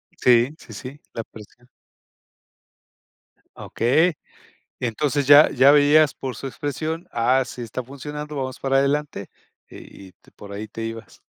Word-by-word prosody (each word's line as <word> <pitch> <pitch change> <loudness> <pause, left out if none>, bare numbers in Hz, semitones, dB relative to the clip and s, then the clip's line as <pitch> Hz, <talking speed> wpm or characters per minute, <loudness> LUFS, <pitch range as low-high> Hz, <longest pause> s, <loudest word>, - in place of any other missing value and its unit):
Sí, 125 +4 +3
sí, - - -14
sí, 135 +3 -9
la 115 - -4
presión. 115 +4 -16 1.9
Okey. 155 +8 +1 0.6
Y - - -3
entonces 140 +3 -1
ya 145 +1 +8
ya 135 +2 +5
veías 150 0 +5
por 130 -4 -6
su 135 - -6
expresión, 155 +6 -5
ah, 125 +3 +2
sí 125 - -9
está 120 +2 -5
funcionando, 150 +3 -8
vamos 130 -1 -4
para 135 0 +1
adelante 140 -6 -1 0.4
y 95 - -13
y - - -17
te - - -25
por 100 -1 -13
ahí 105 +2 -6
te 115 +2 -7
ibas. 115 0 -9
135 Hz, 150 wpm, -22 LUFS, 115-145 Hz, 1.9 s, ya